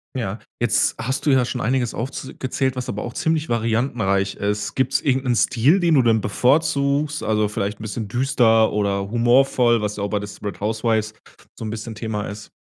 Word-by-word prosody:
Ja. 110 -4 -3 0.2
Jetzt 120 -2 +2
hast 130 +3 -2
du 145 - +4
ja 130 -2 +4
schon 125 +1 -3
einiges 125 0 0
aufz 130 +2 -5
gezählt, 130 0 -1
was 125 0 -4
aber 105 -3 -4
auch 120 - -6
ziemlich 160 0 -1
variantenreich 115 -4 0
ist. 105 +1 -2
Gibt's 130 0 +1
irgend 130 -1 +1
'nen 125 -2 +1
Stil, 135 +12 +3
den 170 -3 +3
du 130 - +5
dann 115 -2 +3
bevorzugst, 140 +5 +1
also, 110 -1 +1
vielleicht 105 0 -3
'n - - -10
bisschen 110 0 -4
düster 115 -2 +3
oder 100 -1 -1
humorvoll, 120 0 +3
was 105 0 -2
ja 100 - -3
auch 100 - -2
bei 105 - 0
„Desperate 105 0 -7
Houswives“ 110 0 -1 0.4
so - - -6
'n 110 - -4
bisschen 110 0 -6
Thema 105 -1 -4
ist? 105 +1 -8
115 Hz, 195 wpm, -21 LUFS, 105-130 Hz, 0.4 s, du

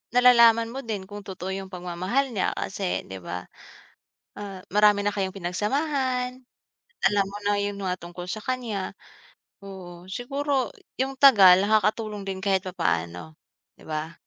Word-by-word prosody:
nalalaman 235 -2 +6
mo 265 - -5
din 210 -5 -4
kung 205 0 -7
totoo 190 -1 -5
yung 195 0 -6
pagmamahal 185 +9 -1
niya 205 -6 0
kasi, 190 -1 -2
'di 95 0 -7
ba? 90 +1 -6 0.9
Ah, 200 -2 -7
marami 210 0 +5
na 205 - +1
kayong 190 -1 -2
pinagsamahan, 250 - -1 0.6
alam 205 -1 +3
mo 200 +1 -7
na 205 0 +2
yung 200 0 -3
mga 185 -1 -1
tungkol 175 +1 -8
sa 215 - -4
kanya. 235 -7 -3 0.7
Oo, 180 -2 -10
siguro 275 +4 -1 0.3
yung 270 +1 0
tagal, 195 -9 +8
nakakatulong 215 -1 +1
din 190 -1 -4
kahit 190 -2 +2
papaano, 85 - -2 0.4
'di - - -18
ba? 155 +1 -3
200 Hz, 145 wpm, -25 LUFS, 185-235 Hz, 0.9 s, tagal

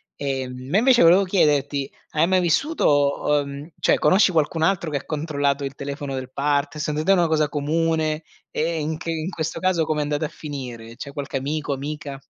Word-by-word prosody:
Ehm, 130 -2 -4
ma 185 - +2
invece 245 -2 +5
volevo 180 +4 +7
chiederti, 145 -6 +1 0.2
hai 155 +1 +3
mai 185 0 +3
vissuto 155 - +2 0.2
uhm, 140 +3 -7
cioè - - +3
conosci 190 0 +4
qualcun 160 0 +1
altro 175 -2 +1
che 145 - 0
ha - - -8
controllato 145 -2 -1
il 135 0 -6
telefono 140 0 -5
del 130 0 -6
part 145 +2 0
Secondo 150 0 -2
te 195 - +3
è - - +8
una 175 -2 +3
cosa 155 -2 +1
comune 155 +1 0 0.3
e 165 +1 -1
in 155 +1 -2
che 165 +1 -4
in 160 +1 -3
questo 165 -2 -3
caso 185 -3 +2
com'è 150 -1 0
andata 145 +1 -1
a - - -4
finire? 125 -6 -8
C'è 140 - -7
qualche 140 -1 -4
amico, 145 +1 -2
amica? 145 0 -5
150 Hz, 195 wpm, -23 LUFS, 140-165 Hz, 0.3 s, è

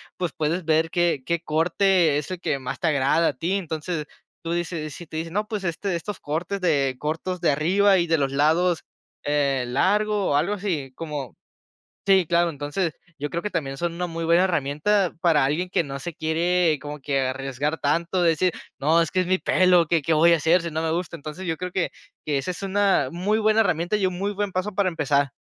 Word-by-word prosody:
pues, 175 -4 -2
puedes 160 +4 -1
ver 160 0 +2
qué 175 -6 +1
qué 170 -1 -1
corte 170 0 +2
es 150 +4 -4
el 185 - -4
que 150 - -1
más 130 0 -5
te 170 - 0
agrada 150 +3 +2
a - - -3
ti, 170 +9 -2
entonces, 160 -3 -4 0.4
tú 165 0 -3
dices 165 -4 -3
si 175 - -9
te 155 - -7
dicen: 165 +1 -4
"No, 210 +2 -1
pues, 210 -3 -3
este 175 +2 -2
estos 205 +4 -7
cortes 175 +6 -3
de 140 -7 +1
cortos 165 +5 -3
de - - +3
arriba 190 +7 +3
y 170 -1 +1
de 165 0 +3
los 135 -2 0
lados, 160 +5 +2 0.4
eh, 140 -3 +1
largo 205 +9 +1
o - - +2
algo 165 +8 +1
así". 170 -10 -3
Como 150 -6 -6 0.7
Sí, 190 -3 +4
claro. 170 +1 +2
Entonces, 150 +3 -3 0.2
yo 145 - -3
creo 170 - -3
que 210 - -3
también 135 -6 -3
son 170 +4 -2
una 180 +1 -2
muy 165 0 -4
buena 170 +2 +4
herramienta 175 +4 +1
para 160 -5 +3
alguien 155 +7 0
que 170 - +1
no 140 -1 -6
se 165 +5 -6
quiere 165 +1 +1
como 150 +1 -7
que 140 0 0
arriesgar 135 +3 -2
tanto, 170 +5 0
de 170 - +5
decir: 175 +3 +1 0.3
"No, 160 +4 +3
es 165 - -3
que 185 - +2
es 185 - 0
mi 185 0 +3
pelo, 180 -3 +4
¿qué 165 +1 +2
qué 160 +3 +1
voy 165 +2 +5
a - - +6
hacer 165 +3 +3
si 170 - -4
no 160 +1 -2
me 160 - 0
gusta?" 170 0 -3
Entonces 155 +4 -8
yo 165 -2 -1
creo 180 0 -4
que, 180 -2 0 0.3
que 145 -2 0
esa 135 - -3
es 180 - -9
una 195 -8 +2
muy 200 +5 0
buena 215 0 +3
herramienta 180 -1 +1
y 200 -2 +1
un 180 -1 -3
muy 200 +1 -1
buen 205 0 -2
paso 185 +2 -2
para 200 -1 +2
empezar. 145 -5 +1
165 Hz, 225 wpm, -24 LUFS, 150-185 Hz, 0.7 s, a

